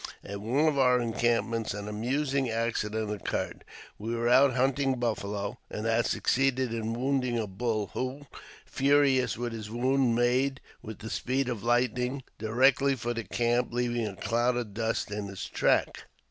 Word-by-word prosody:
At 100 0 -6
one 130 +9 +2
of 145 -3 +1
our 125 -1 +5
encampments 115 -1 0
an 105 0 -6
amusing 130 +5 -1
accident 110 -2 -1
occurred. 105 -3 -3 0.4
We 115 +3 -3
were 120 0 0
out 130 +1 +5
hunting 135 +1 +2
buffalo, 105 -2 -3
and 105 - -5
had 115 +1 +2
succeeded 130 -2 +1
in 115 0 -2
wounding 130 -2 0
a 115 - -1
bull, 105 +1 -2
who, 130 +3 -4 0.4
furious 135 -5 +2
with 120 0 -3
his 110 -2 -6
wound, 125 +1 +2
made, 130 +3 +2 0.2
with 110 -3 -8
the 110 - -8
speed 130 +1 -1
of 120 -5 -3
lightning, 125 +3 0 0.2
directly 130 +5 +3
for 120 -1 -3
the 115 -1 -4
camp, 120 +1 0
leaving 120 -2 0
a 100 - -6
cloud 120 +4 0
of 115 -5 -4
dust 110 -1 -2
in 105 -1 -3
his 100 -1 -6
track. - - +1
120 Hz, 160 wpm, -29 LUFS, 110-130 Hz, 0.4 s, our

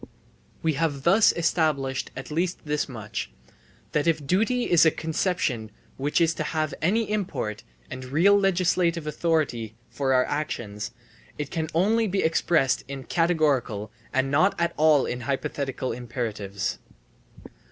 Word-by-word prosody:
We 160 -1 +2
have 145 -2 -1
thus 195 +5 +6
established 155 -6 0
at 135 - -7
least 175 +2 -1
this 150 -1 -1
much, 110 -4 -5 0.6
that 150 +2 0
if 155 -3 +1
duty 225 - +2
is 175 -7 +5
a 160 - +7
conception 155 - -1 0.3
which 145 +5 0
is 165 -1 +3
to - - -3
have 155 -2 -1
any 210 +6 +1
import 190 - -2 0.3
and 130 - -6
real 165 +10 +4
legislative 180 -4 +2
authority 150 -9 -1 0.2
for 135 -2 -1
our 125 - +4
actions, 120 -8 -3 0.5
it 145 -1 -4
can 160 -2 -2
only 220 +6 +3
be 195 0 0
expressed 160 -4 +2
in 135 -1 -6
categorical 140 - +1 0.2
and 135 0 +1
not 165 +8 +3
at 170 0 +1
all 155 -2 +4
in 125 - -3
hypothetical 135 0 -2
imperatives. 110 -5 -4
155 Hz, 140 wpm, -25 LUFS, 130-170 Hz, 0.6 s, a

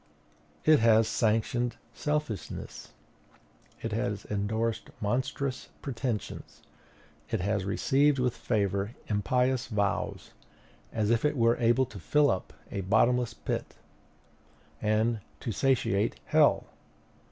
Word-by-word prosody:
It 155 -2 +6
has 115 -1 +5
sanctioned 120 +2 +1 0.2
selfishness; 150 - -4 0.9
it 115 - -2
has 105 -2 -2
indorsed 110 +2 -1
monstrous 130 +4 -2
pretensions; 125 -4 -4 0.7
it - - 0
has 100 0 0
received 140 +8 +2
with 125 -2 0
favor 100 0 -1
impious 125 +5 +1
vows, 100 -3 -1 0.6
as 110 -1 0
if 115 -1 +2
it 150 -1 +1
were 115 0 +4
able 120 +2 +3
to 105 -4 -10
fill 145 - +3
up 95 - -3 0.2
a 100 - -2
bottomless 115 +4 +2
pit, - - -4 1.1
and 110 +2 +1 0.2
to 115 - -3
satiate 115 -5 +1
hell! - - +4
115 Hz, 105 wpm, -29 LUFS, 105-125 Hz, 1.1 s, It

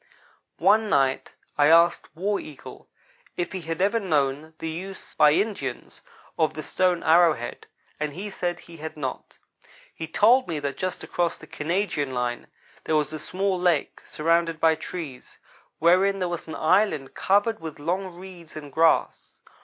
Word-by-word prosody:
One 215 +1 +4
night 135 -4 +1 0.3
I 145 - +6
asked 170 +2 +4
War 200 +5 -1
Eagle 150 -4 -11 0.5
if 175 - -2
he 190 - -5
had 165 +2 -2
ever 205 +4 +2
known 155 -4 -1
the 160 - -5
use, 185 +4 -7
by 150 -1 +5
Indians, 175 - -3 0.4
of 155 -3 +2
the 155 - -5
stone 180 +2 +1
arrow 165 0 +6
head, 120 +1 -8 0.3
and 150 -1 -2
he 200 +6 -6
said 175 -2 -3
he 170 - -13
had 160 0 -7
not. 135 -3 -5 0.6
He 160 - -6
told 235 +10 +4
me 165 -3 -2
that 140 -2 -3
just 185 +3 -4
across 175 -1 -1
the - - -13
Canadian 150 -5 -2
line 120 -1 -2 0.4
there 160 - +1
was 150 0 +1
a 155 - -4
small 190 +4 -1
lake, 175 -5 +1
surrounded 165 +1 0
by 160 0 +5
trees, 160 -4 -8 0.4
wherein 185 +4 +4
there 185 -2 -1
was 175 -1 -5
an 160 - -6
island 160 -5 +2
covered 205 +3 +2
with 160 -2 -7
long 180 +6 -2
reeds 175 -3 -12
and 145 -3 -9
grass. 165 0 +1
165 Hz, 165 wpm, -25 LUFS, 150-185 Hz, 0.6 s, I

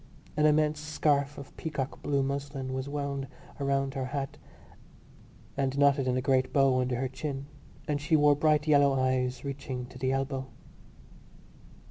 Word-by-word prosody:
An 150 +1 +4
immense 150 0 +3
scarf 150 -2 0
of 140 - -10
peacock 150 -5 -4
blue 140 -1 +1
muslin 140 -1 -3
was 130 +1 -3
wound 140 -1 -3 0.3
round 135 -1 0
her 135 -2 -2
hat 135 +1 -4 1.2
and 135 0 -1
knotted 140 -1 +4
in 125 0 +1
a 130 - -1
great 130 -1 +2
bow 135 -2 +4
under 125 0 0
her 130 +2 -1
chin; 135 +1 -5 0.4
and 145 -1 -1
she 160 +2 +2
wore 145 -1 +6
bright 150 0 +3
yellow 140 -2 +5
gloves, 130 0 0
reaching 135 -2 -4
to 125 +1 -12
the 130 0 0
elbow. 135 0 -2
140 Hz, 155 wpm, -29 LUFS, 130-145 Hz, 1.2 s, wore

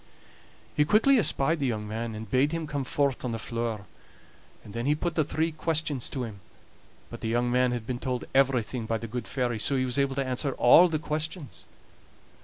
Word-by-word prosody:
He 150 - +4
quickly 225 - +4
espied 160 -5 +2
the 140 - 0
young 105 -3 -2
man, 110 +1 -4
and 110 +1 -7
bade 130 +8 +2
him 165 -1 -2
come 145 -2 -3
forth 140 0 0
on 125 -2 -2
the - - -2
floor. 115 -2 -3 0.8
And 100 - -12
then 115 +3 -3
he 150 - +3
put 170 +3 -2
the 155 - +2
three 160 +3 -1
questions 155 -4 -1
to 130 - -3
him, 110 -4 -7 0.7
but - - -8
the - - -3
young 120 +1 +1
man 125 0 +3
had 120 -2 -3
been 120 0 -3
told 125 -1 -3
everything 125 -4 +1
by 115 - 0
the 115 - -7
good 115 -2 -5
fairy, 120 -2 -1
so 135 +6 +2
he 130 -1 +1
was 125 +2 0
able 140 -1 +1
to 135 0 -1
answer 130 +2 -1
all 160 +10 +7
the 160 -2 -1
questions. 155 0 -4
130 Hz, 210 wpm, -27 LUFS, 115-150 Hz, 0.8 s, all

